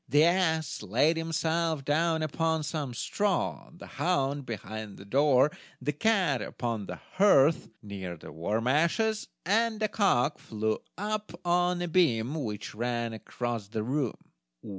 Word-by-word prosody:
The 145 +1 +5
ass 165 -2 +2
laid 120 - +2
himself 165 -2 -1
down 160 +2 +2
upon 160 +1 0
some 145 -5 -3
straw, 190 - -1
the 170 - -12
hound 140 -6 -1
behind 110 -2 -6
the 100 - -11
door, 140 +4 +4 0.3
the 145 +3 -2
cat 180 - +2
upon 115 -4 -3
the - - -5
hearth, 165 -6 +3
near 95 -4 -6
the - - -11
warm 105 +9 -2
ashes, 170 - +2 0.2
and 220 +3 +2
the 215 - +2
cock 155 - +2
flew 110 0 -2 0.2
up 210 -3 -3
on 175 0 +2
a - - -2
beam 145 -8 +2
which 110 -9 -4
ran 120 0 -2
across 115 -1 -4
the 110 +1 -3
room. 130 +1 -1
150 Hz, 140 wpm, -29 LUFS, 115-170 Hz, 0.3 s, The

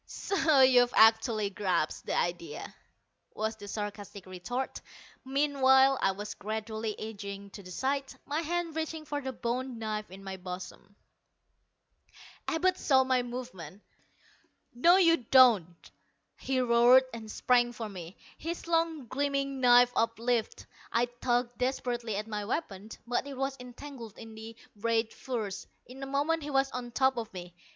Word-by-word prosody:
"So 320 -8 +2
you've 250 -2 +5
actually 220 -2 +4
grasped 185 -6 -1
the - - 0
idea!" 170 -3 -3 0.6
was 220 +1 -2
the 205 -2 -11
sarcastic 205 -1 -6
retort. 190 +8 -4 0.4
Meanwhile 270 -1 +4
I - - +3
was 205 +1 -6
gradually 220 +1 -4
edging 200 -2 -7
to 200 - -9
the 185 - -12
side, 270 +8 -2
my 300 +3 -1
hand 335 0 -2
reaching 320 -1 -4
for 290 -1 -3
the 265 -1 -4
bone 250 +1 -3
knife 215 -1 -4
in 190 +2 -11
my 190 -1 -6
bosom. 185 +2 -9 1.5
Abud 365 +3 +1
saw 265 -2 +4
my 260 -1 +2
movement. 240 -8 -8 0.9
"No, 335 +9 +5
you 335 -3 +5
don't!" 225 - +4 0.4
he 265 -1 -1
roared, 245 +1 +6
and 225 -2 -8
sprang 240 +1 +2
for 230 -2 -6
me, 180 -3 -9 0.2
his 335 +2 -5
long 330 -4 0
gleaming 275 +1 -1
knife 245 0 +6
uplifted. 230 0 0 0.3
I 235 +1 +2 0.2
tugged 245 -1 0
desperately 245 -3 -1
at 210 +1 -3
my 210 -2 -4
weapon, 210 - -4 0.2
but 245 +3 -1
it 275 -2 -7
was 270 0 -1
entangled 250 -2 -10
in 225 -1 -10
the 220 +1 -9 0.2
ragged 225 +1 0
furs. 220 -7 -5 0.2
In 260 +2 -12
a 270 - -4
moment 290 +4 0
he 295 - -6
was 270 -1 +1
on 250 -1 -5
top 265 +1 +2
of 225 -2 -4
me. 175 -1 -8
240 Hz, 150 wpm, -30 LUFS, 210-270 Hz, 1.5 s, roared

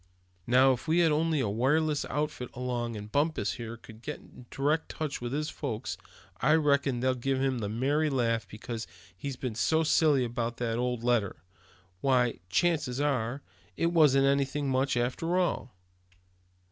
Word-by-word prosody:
"Now, 130 +2 +5
if 125 +6 -7
we 170 +2 +4
only 160 0 +2
had - - 0
a - - -1
wireless 145 +7 +1
outfit 150 -4 -3
along, 120 -2 -3
and 105 0 -8
Bumpus, 155 +3 +1
here, 115 -1 -6
could 110 -1 -14
get 150 - -5
in 125 - -16
direct 150 +4 0
touch 150 -5 -4
with 120 0 -4
his 150 +2 -2
folks, 130 -5 -4 0.5
I 150 +6 +5
reckon 140 -5 +2
they'd 130 -1 0
give 135 +1 0
him 130 -2 0
the 105 -2 -3
merry 140 +8 +1
laugh 115 -4 0
because 115 +1 -6 0.3
he's 135 +8 -5
been 125 -2 -4
so 160 +8 +2
silly 150 -4 +3
about 120 0 -3
that 115 -1 -1
old 125 -1 -1
letter. 110 -10 0 0.6
Why, 125 -4 +2
chances 145 - +1
are, 135 -2 -1 0.3
it 170 +1 +1
wasn't 140 -5 +5
anything 140 0 +1
much, 130 0 +1
after 130 +9 0
all. 170 - 0
130 Hz, 165 wpm, -29 LUFS, 120-150 Hz, 0.6 s, Now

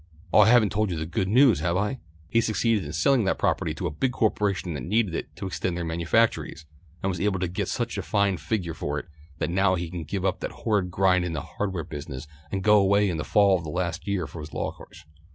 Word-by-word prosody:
Oh, - - +7
I 105 +1 +7
haven't 115 -4 +5
told 105 0 0
you 85 - -2
the 80 - -3
good 85 +3 -1
news, 120 - +5
have 85 +2 0
I! 105 +6 -1 0.3
He 115 - +2
succeeded 110 -3 +1
in 75 - -6
selling 115 - +3
that 95 - +1
property - - 0
to - - -4
a - - -1
big 125 - -1
corporation 100 -6 0
that 70 - -5
needed 100 - 0
it 75 -2 -5
to 95 - -6
extend 90 -1 -2
their 85 - -3
manufactories, 85 +1 0 0.4
and 95 - +1
was 90 - -4
able 100 -2 +1
to 90 - 0
get 85 - -3
such - - -2
a - - -1
fine 100 -2 +1
figure 90 -2 -2
for 75 -2 -3
it - - -5 0.3
that 80 - -2
now 95 +1 +3
he 85 -1 -4
can 85 -2 -5
give 95 +5 -3
up 95 +1 0
that - - -3
horrid 105 -5 +1
grind 90 0 +3
in 90 -2 -3
the 80 - -3
hardware 95 -2 -4
business 70 -1 -7 0.3
and 95 -1 -2
go 105 0 +6
away 100 +1 +3
in 85 - -3
the 75 - -2
fall 100 -3 +4
for - - -9
the 80 - -6
last 85 +3 -3
year 100 -3 0
of 70 - -9
his 75 -2 -8
law - - -2
course. 85 -2 -15
95 Hz, 255 wpm, -26 LUFS, 85-105 Hz, 0.4 s, Oh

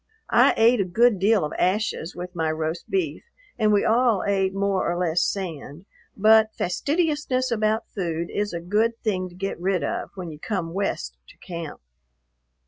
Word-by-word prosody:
I - - +5
ate 230 0 +5
a - - +3
good 215 +3 +3
deal 200 -2 +3
of 150 - -5
ashes 190 -2 0
with 180 +1 -7
my 160 -1 0
roast 160 +1 -4
beef 380 -4 -1 0.4
and 215 -1 +3
we 205 -1 +3
all 230 -3 +3
ate 195 -1 +1
more 195 -2 0
or 175 - -2
less 175 -1 +1
sand, 170 -4 -4 0.3
but 220 +1 +5
fastidiousness 285 - 0
about 220 0 0
food 170 -3 -3
is 205 0 -1
a 170 - -4
good 215 +6 +1
thing 185 -5 -1
to 175 - -16
get 195 -1 -4
rid 185 0 0
of - - -3
when 180 -4 -6
you 150 - -11
come 175 -4 -3
West 125 - -3
to - - -17
camp. 170 -4 -7
195 Hz, 175 wpm, -24 LUFS, 175-220 Hz, 0.4 s, I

